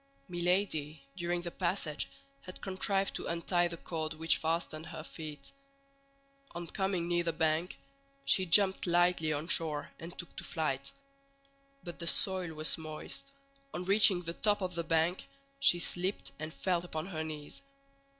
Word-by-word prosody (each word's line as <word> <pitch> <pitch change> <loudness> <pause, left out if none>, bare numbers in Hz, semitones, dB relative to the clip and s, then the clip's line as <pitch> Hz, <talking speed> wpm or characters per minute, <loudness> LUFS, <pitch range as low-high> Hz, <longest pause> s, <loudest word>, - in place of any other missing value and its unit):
Milady, 175 -4 +1 0.2
during 175 -1 -1
the 170 - -4
passage 170 -4 -1 0.4
had 185 - -8
contrived 195 0 0
to - - -3
untie 175 +1 +2
the 170 0 -5
cord 160 -1 -3
which 160 +1 +3
fastened 160 -1 -1
her 155 - -7
feet. 155 -2 -8 1.0
On 170 0 -4
coming 185 0 -1
near 175 0 +2
the 170 - +1
bank, 160 +2 +1 0.5
she 185 -1 +4
jumped 190 +2 +5
lightly 175 -2 +3
on 150 +2 -2
shore 155 -4 0
and 170 +2 -8
took 175 - -7
to - - -4
flight. 140 -4 -2 0.9
But 175 -2 -7
the 170 - -3
soil 185 -4 +2
was 155 +1 -1
moist; 160 - -5 0.4
on 180 - -3
reaching 195 -2 +6
the 170 0 -3
top 205 +1 +1
of 180 -1 -2
the 170 0 -1
bank, 165 +2 +1 0.3
she 275 -10 +6
slipped 180 -2 -1
and 155 +1 -4
fell 175 0 0
upon 160 -3 -4
her 160 -4 -3
knees. 150 -2 -6
170 Hz, 155 wpm, -33 LUFS, 160-180 Hz, 1.0 s, reaching